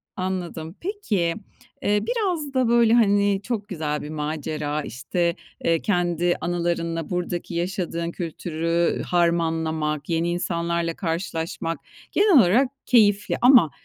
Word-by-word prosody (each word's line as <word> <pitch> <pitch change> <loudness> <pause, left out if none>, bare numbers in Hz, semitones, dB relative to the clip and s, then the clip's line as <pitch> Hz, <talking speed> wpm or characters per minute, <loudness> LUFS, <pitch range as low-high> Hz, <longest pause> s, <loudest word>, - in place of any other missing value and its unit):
Anladım. 180 -3 -4
Peki, 220 - -1 0.5
eee, 205 0 +2
biraz 365 - -1
da, 260 -2 +2
böyle, 235 -1 +4
hani, 205 -3 +4
çok 215 -2 -3
güzel 155 -6 -3
bir 150 - -7
macera, 150 0 -3
işte, 170 +7 -2 0.3
eee, 165 -1 +2
kendi 175 -3 +1
anılarınla 170 -2 -1
buradaki 175 -1 -3
yaşadığın 170 -1 -2
kültürü 165 0 -1
harmanlamak, 160 -3 0
yeni 165 +1 +1
insanlarla 170 -1 -1
karşılaşmak 165 -1 -3 0.3
genel 405 -1 +4
olarak 235 +6 +5 0.2
keyifli 205 -4 +3
ama 245 - +7
175 Hz, 115 wpm, -24 LUFS, 165-205 Hz, 0.5 s, ama